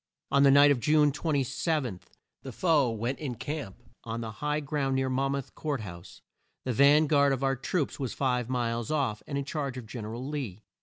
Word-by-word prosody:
On 140 Hz, -, +4 dB
the 140 Hz, -, +7 dB
night 140 Hz, +1 st, +7 dB
of 135 Hz, -, +2 dB
June 150 Hz, +2 st, +4 dB
27, 145 Hz, -, -1 dB, 0.4 s
the 135 Hz, -, -7 dB
foe 150 Hz, -1 st, +2 dB
went 115 Hz, +4 st, -3 dB
in 135 Hz, -5 st, -4 dB
camp 145 Hz, -5 st, -6 dB, 0.2 s
on 115 Hz, 0 st, -4 dB
the 110 Hz, -1 st, -5 dB
high 150 Hz, +6 st, -2 dB
ground 140 Hz, -2 st, -1 dB
near 130 Hz, 0 st, 0 dB
Mon 135 Hz, +1 st, 0 dB
mouth 140 Hz, -2 st, -5 dB
Court 145 Hz, -5 st, -3 dB
House. 85 Hz, -4 st, -10 dB, 0.4 s
The 130 Hz, -, 0 dB
van 145 Hz, +5 st, +6 dB
guard 140 Hz, -1 st, +4 dB
of 135 Hz, 0 st, -1 dB
our 135 Hz, 0 st, +2 dB
troops 145 Hz, +4 st, -2 dB
was 130 Hz, -4 st, -2 dB
five 125 Hz, -3 st, 0 dB
miles 120 Hz, -1 st, -1 dB
off, 135 Hz, -9 st, 0 dB
and 140 Hz, -, -3 dB
in 140 Hz, -, -2 dB
charge 140 Hz, -3 st, -3 dB
of 125 Hz, -, -7 dB
Gen 110 Hz, 0 st, -7 dB
er 110 Hz, +2 st, -5 dB
al 125 Hz, +3 st, -5 dB
Lee. 125 Hz, -9 st, -5 dB
135 Hz, 210 wpm, -29 LUFS, 120-145 Hz, 0.4 s, the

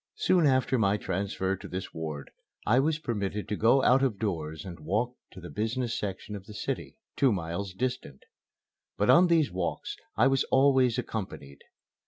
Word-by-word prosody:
Soon 175 Hz, -5 st, +3 dB
after 130 Hz, -1 st, +2 dB
my 100 Hz, -1 st, +3 dB
transfer 95 Hz, -2 st, -2 dB
to 95 Hz, -, -10 dB
this 90 Hz, +1 st, -6 dB
ward 80 Hz, -3 st, -6 dB, 0.3 s
I 120 Hz, +5 st, +4 dB
was 155 Hz, +3 st, +2 dB
permitted 105 Hz, -8 st, -3 dB
to 105 Hz, -, -1 dB
go 120 Hz, +6 st, +4 dB
out 130 Hz, +2 st, +5 dB
of 130 Hz, -7 st, +1 dB
doors 80 Hz, -7 st, -3 dB
and 85 Hz, -3 st, -8 dB
walk 105 Hz, +11 st, -1 dB, 0.2 s
to -, -, -10 dB
the 90 Hz, -1 st, -9 dB
business 115 Hz, +2 st, -2 dB
section 100 Hz, +1 st, -4 dB
of 100 Hz, -1 st, -9 dB
the 105 Hz, -, -10 dB
city, 135 Hz, -, -4 dB, 0.2 s
two 135 Hz, -3 st, +4 dB
miles 90 Hz, +1 st, -3 dB
distant. 100 Hz, -, -4 dB, 0.7 s
But 105 Hz, -, +4 dB
on 180 Hz, +1 st, +7 dB
these 165 Hz, -4 st, +3 dB
walks 90 Hz, -1 st, -3 dB, 0.2 s
I 110 Hz, -, +5 dB
was 135 Hz, 0 st, +3 dB
always 130 Hz, -3 st, +4 dB
accompanied. 95 Hz, -, -5 dB
105 Hz, 175 wpm, -28 LUFS, 95-130 Hz, 0.7 s, on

